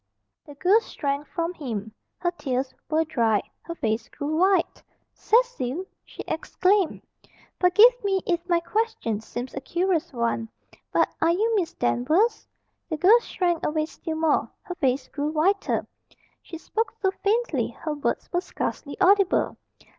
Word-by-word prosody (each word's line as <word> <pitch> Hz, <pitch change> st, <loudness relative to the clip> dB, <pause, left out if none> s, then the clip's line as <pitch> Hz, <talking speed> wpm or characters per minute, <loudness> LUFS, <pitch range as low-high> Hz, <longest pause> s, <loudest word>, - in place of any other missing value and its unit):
The 290 Hz, -, -11 dB
girl 375 Hz, +9 st, +4 dB
shrank 285 Hz, -8 st, -3 dB
from 335 Hz, 0 st, -2 dB
him. 220 Hz, -, -5 dB, 0.2 s
Her 350 Hz, -, 0 dB
tears 260 Hz, -5 st, -3 dB, 0.2 s
were 320 Hz, +1 st, +2 dB
dried. 230 Hz, -9 st, +1 dB, 0.2 s
Her 335 Hz, -, -7 dB
face 225 Hz, -4 st, -2 dB
grew 295 Hz, +2 st, -3 dB
white. 370 Hz, +1 st, +2 dB, 0.3 s
"Cecil!" 405 Hz, -, +1 dB, 0.2 s
she -, -, -9 dB
exclaimed. 370 Hz, +3 st, +1 dB, 0.6 s
"Forgive 430 Hz, +7 st, +6 dB
me 390 Hz, -2 st, +1 dB
if 345 Hz, -2 st, +1 dB
my 345 Hz, -1 st, +4 dB
question 415 Hz, -, -1 dB
seems 245 Hz, +3 st, -6 dB
a 270 Hz, -, -5 dB
curious 345 Hz, +3 st, 0 dB
one, 235 Hz, -2 st, -1 dB, 0.4 s
but -, -, +3 dB
are 325 Hz, -, +4 dB
you 430 Hz, +7 st, +2 dB
Miss 365 Hz, -6 st, -1 dB
Danvers?" 315 Hz, -, +1 dB, 0.4 s
The 315 Hz, -, -2 dB
girl 400 Hz, +9 st, +6 dB
shrank 350 Hz, -6 st, -1 dB
away 310 Hz, 0 st, 0 dB
still 320 Hz, 0 st, -6 dB
more. 315 Hz, -2 st, +2 dB
Her 365 Hz, -, -5 dB
face 270 Hz, -6 st, 0 dB
grew 290 Hz, 0 st, -3 dB
whiter. 345 Hz, +6 st, +1 dB, 0.6 s
She 330 Hz, -, -9 dB
spoke 445 Hz, +7 st, -2 dB
so 380 Hz, -2 st, +2 dB
faintly 455 Hz, +4 st, +1 dB
her 310 Hz, -2 st, -5 dB
words 290 Hz, 0 st, -2 dB
were 350 Hz, -, +2 dB
scarcely 285 Hz, -5 st, -4 dB
audible. 390 Hz, 0 st, +4 dB
330 Hz, 145 wpm, -25 LUFS, 280-385 Hz, 0.6 s, Forgive